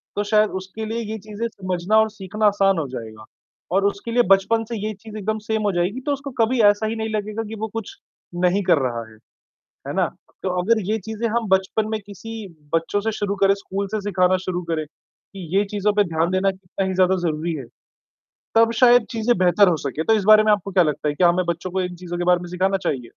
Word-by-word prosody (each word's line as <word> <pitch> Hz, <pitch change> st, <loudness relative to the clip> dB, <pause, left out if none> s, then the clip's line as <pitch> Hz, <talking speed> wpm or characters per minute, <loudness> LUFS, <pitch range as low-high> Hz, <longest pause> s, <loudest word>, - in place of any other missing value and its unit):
तो 205 Hz, -, 0 dB
शायद 210 Hz, 0 st, +3 dB
उसके 190 Hz, +4 st, -7 dB
लिए 225 Hz, +2 st, -3 dB
ये 220 Hz, -, -3 dB
चीज़ें 215 Hz, +3 st, -5 dB
समझना 185 Hz, -1 st, -1 dB
और 220 Hz, 0 st, +3 dB
सीखना 210 Hz, +1 st, -3 dB
आसान 195 Hz, -2 st, +3 dB
हो 155 Hz, -4 st, -1 dB
जाएगा 110 Hz, -4 st, -8 dB, 0.5 s
और 195 Hz, +1 st, +3 dB
उसके 200 Hz, +3 st, -2 dB
लिए 245 Hz, +1 st, +4 dB
बचपन 225 Hz, +4 st, +4 dB
से 235 Hz, -, -3 dB
ये 215 Hz, +1 st, -3 dB
चीज़ 215 Hz, +2 st, -11 dB
एकदम 215 Hz, +1 st, -2 dB
सेम 220 Hz, -1 st, 0 dB
हो 205 Hz, -, +2 dB
जाएगी 180 Hz, +8 st, 0 dB
तो -, -, +2 dB
उसको 280 Hz, 0 st, -6 dB
कभी 235 Hz, +2 st, +2 dB
ऐसा 205 Hz, +1 st, 0 dB
ही 225 Hz, -, -2 dB
नहीं 220 Hz, 0 st, -3 dB
लगेगा 215 Hz, +2 st, -3 dB
कि 220 Hz, -, -6 dB
वो 220 Hz, -, -1 dB
कुछ 225 Hz, -2 st, -6 dB, 0.5 s
नहीं 180 Hz, +3 st, +3 dB
कर 170 Hz, -, +4 dB
रहा 120 Hz, -3 st, -2 dB
है। 110 Hz, -, -17 dB, 0.7 s
है -, -, -3 dB
ना? -, -, +3 dB, 0.4 s
तो 190 Hz, -, 0 dB
अगर 220 Hz, +4 st, +2 dB
ये 220 Hz, -, +1 dB
चीज़ें 220 Hz, +1 st, -2 dB
हम 230 Hz, 0 st, -1 dB
बचपन 190 Hz, +3 st, +1 dB
में 220 Hz, -, -1 dB
किसी 220 Hz, +2 st, -8 dB, 0.3 s
बच्चों 165 Hz, +5 st, 0 dB
से 225 Hz, +2 st, -1 dB
शुरू 205 Hz, -1 st, -2 dB
करे, 195 Hz, 0 st, +3 dB
स्कूल 200 Hz, 0 st, -4 dB
से 215 Hz, -1 st, -2 dB
सिखाना 185 Hz, -2 st, +2 dB
शुरू 180 Hz, -1 st, -2 dB
करे 155 Hz, -1 st, -1 dB
कि 180 Hz, +4 st, -14 dB
ये 200 Hz, -, +4 dB
चीज़ों 205 Hz, 0 st, +1 dB
पे 205 Hz, -, +4 dB
ध्यान 165 Hz, -1 st, -1 dB
देना 190 Hz, +1 st, +2 dB
कितना 190 Hz, 0 st, -5 dB
ही 190 Hz, -, -2 dB
ज़्यादा 185 Hz, 0 st, +3 dB
ज़रूरी 160 Hz, +2 st, -2 dB
है। 135 Hz, -5 st, -6 dB, 0.9 s
तब 230 Hz, 0 st, +5 dB
शायद 245 Hz, -2 st, +6 dB
चीज़ें 230 Hz, -1 st, +1 dB
बेहतर 185 Hz, +2 st, +4 dB
हो 165 Hz, -, +1 dB
सके। 155 Hz, +4 st, -3 dB
तो 225 Hz, -, +3 dB
इस 215 Hz, -2 st, +1 dB
बारे 215 Hz, 0 st, +7 dB
में 215 Hz, -, +3 dB
आपको 200 Hz, -1 st, 0 dB
क्या 180 Hz, -1 st, +4 dB
लगता 150 Hz, -1 st, -1 dB
है 145 Hz, -, -3 dB
कि 185 Hz, -, 0 dB
हमें 175 Hz, +1 st, +4 dB
बच्चों 170 Hz, +1 st, -3 dB
को 190 Hz, 0 st, 0 dB
इन 180 Hz, -1 st, -4 dB
चीज़ों 175 Hz, 0 st, -6 dB
के 175 Hz, -, -2 dB
बारे 180 Hz, 0 st, +4 dB
में 175 Hz, -, -8 dB
सिखाना 190 Hz, +2 st, +1 dB
चाहिए? 130 Hz, -3 st, -1 dB
200 Hz, 240 wpm, -22 LUFS, 180-220 Hz, 0.9 s, बारे